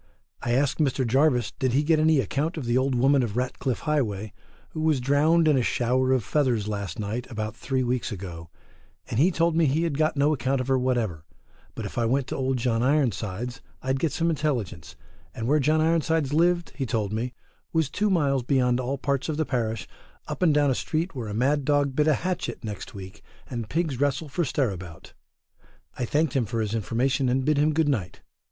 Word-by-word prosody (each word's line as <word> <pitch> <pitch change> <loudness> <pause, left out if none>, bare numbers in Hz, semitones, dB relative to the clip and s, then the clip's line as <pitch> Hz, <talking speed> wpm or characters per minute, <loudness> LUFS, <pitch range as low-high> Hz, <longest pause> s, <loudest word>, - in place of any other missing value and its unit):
I 120 - -1
asked 135 +4 +1
Mr 135 -3 +1
Jarvis 125 -4 +2
did 130 -2 +1
he 140 +3 +3
get 155 0 +3
any 155 -1 +4
account 150 +6 -1
of 145 - -4
the 120 0 0
Old 130 0 +2
Woman 135 +3 +4
of 115 -2 -3
Ratcliffe 125 0 -2
Highway, 110 -9 -1 0.4
who 155 - -5
was 155 -3 +2
drowned 150 +6 +3
in 145 -4 +4
a - - +2
shower 125 +2 +1
of 130 -4 +2
feathers 120 -2 +1
last 100 -4 -4
night 110 +4 -4
about 110 -2 -4
three 130 +2 -1
weeks 125 0 -1
ago, 85 -5 -7 0.6
and 110 - 0
he 165 +6 +5
told 170 -2 +1
me 165 -2 +4
he 150 +5 +1
had 155 -4 -1
got 155 -1 +1
no 145 +2 +3
account 135 0 0
of 130 +1 -3
her 130 -1 +3
whatever, 115 -11 -1 0.5
but - - -5
if - - -4
I 115 - +2
went 135 +2 +1
to 135 0 -1
John 115 -2 0
Ironsides 125 -3 0 0.2
I'd 130 0 0
get 160 0 0
some 170 0 0
intelligence, 110 - -3 0.4
and 115 - -3
where 150 +3 +3
John 155 +3 +2
Ironsides 160 -3 +1
lived 175 +2 +2
he 135 -3 -3
told 110 -3 -1
me 120 +3 -3 0.4
was 160 -3 +1
two 205 +9 0
miles 140 -8 +2
beyond 125 -1 +2
all 130 +2 -2
parts 140 +1 -1
of 155 - -2
the 155 - +1
parish, 115 -5 -2 0.4
up - - -5
and 175 -3 +5
down 145 -2 +3
a - - +3
street 160 +8 -2
where 125 -5 -5
a 105 - -4
mad 140 +5 +2
dog 145 -1 +1
bit 150 +1 +2
a 155 - +4
hatchet 180 -9 -3
next 105 +2 -7
week, 95 -1 -9 0.3
and 115 -4 -5
pigs 155 -6 -1
wrestle 145 +2 0
for 155 +6 -1
stirabout: 95 - -3 0.8
I 125 - -2
thanked 150 +3 +1
him 125 -5 +1
for 115 +1 -2
his 110 -1 -1
information 125 +5 0
and 130 +1 +1
bid 150 -1 +2
him 150 +1 +3
good 155 0 +1
night. 110 -12 -2
130 Hz, 210 wpm, -26 LUFS, 115-150 Hz, 0.8 s, he